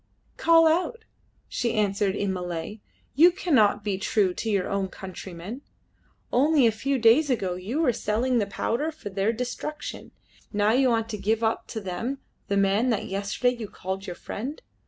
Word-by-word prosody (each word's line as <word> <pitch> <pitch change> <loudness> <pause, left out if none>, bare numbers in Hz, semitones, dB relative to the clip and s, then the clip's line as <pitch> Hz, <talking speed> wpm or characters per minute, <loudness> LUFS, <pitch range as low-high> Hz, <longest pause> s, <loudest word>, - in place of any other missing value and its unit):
"Call 330 -1 +5
out," 370 +8 0 0.4
she 235 - -1
answered 200 -2 +1
in 200 -2 -1
Malay, 180 +3 -5 0.3
"you 325 +7 +7
that 360 - -10
cannot 220 - +3
be 195 -2 -1
true 195 -2 +1
to 225 - -3
your 200 -3 +1
own 200 -1 -1
countrymen. 190 +5 -8 0.7
Only 285 +1 +4
a 230 - +5
few 270 +6 -1
days 245 +6 +5
ago 195 -8 0
you 195 - -3
were 250 - +3
selling 235 +4 0
the 205 - 0
powder 240 +9 -1
for 300 -10 -9
their 195 +3 +1
destruction; 250 +6 -5 0.4
now 205 0 +2
you 260 +2 +4
want 225 -1 +1
to 210 -2 -4
give 220 +3 0
up 220 0 0
to 220 - -5
them 200 +7 -3 0.3
the 200 - 0
man 200 +5 +3
that 225 -4 0
yesterday 205 +6 0
you 230 -3 -6
called 190 0 -5
your 180 - -5
friend. 260 - -6
220 Hz, 180 wpm, -26 LUFS, 195-255 Hz, 0.7 s, you